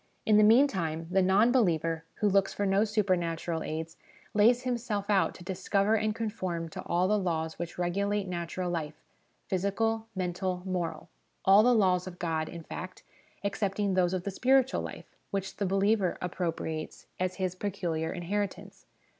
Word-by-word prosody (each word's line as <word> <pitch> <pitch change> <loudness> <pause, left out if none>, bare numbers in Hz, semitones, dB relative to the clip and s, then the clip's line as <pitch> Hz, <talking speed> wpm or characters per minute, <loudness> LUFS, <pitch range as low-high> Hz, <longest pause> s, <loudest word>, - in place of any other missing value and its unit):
In 215 -1 +5
the 215 - +6
meantime, 195 - +3
the 190 +1 +4
non 195 +6 +4
believer, 165 - +1
who 210 - +1
looks 195 -1 +2
for 205 - 0
no 195 +2 +3
supernatural 175 -6 0
aids, 160 +1 -5 0.4
lays 235 +4 +4
himself 225 -5 -2
out 195 -2 +2
to 175 - -11
discover 195 +3 +1
and 215 0 0
conform 185 -7 -3
to - - -7
all 175 +2 +2
the 210 +1 +2
laws 160 -4 -2
which 175 -1 -5
regulate 200 +3 0
natural 175 0 -3
life 155 -3 -3 0.5
physical, 220 +4 0
mental, 180 0 -2
moral; 175 -4 -3 0.4
all 195 +2 +8
the 245 +2 +4
laws 185 -4 +3
of 180 -1 -8
God, 160 -2 -2
in 170 -2 -8
fact, 185 +3 -8 0.4
excepting 200 0 -1
those 185 0 +2
of 180 - -3
the 200 - -3
spiritual 260 +5 +3
life - - -9
which 195 -1 -4
the 200 - 0
believer 195 0 +2
appropriates 165 -3 -4
as 185 0 -1
his 185 -2 -1
peculiar 175 -5 -2
inheritance. 195 +3 -4
190 Hz, 160 wpm, -29 LUFS, 175-205 Hz, 0.5 s, all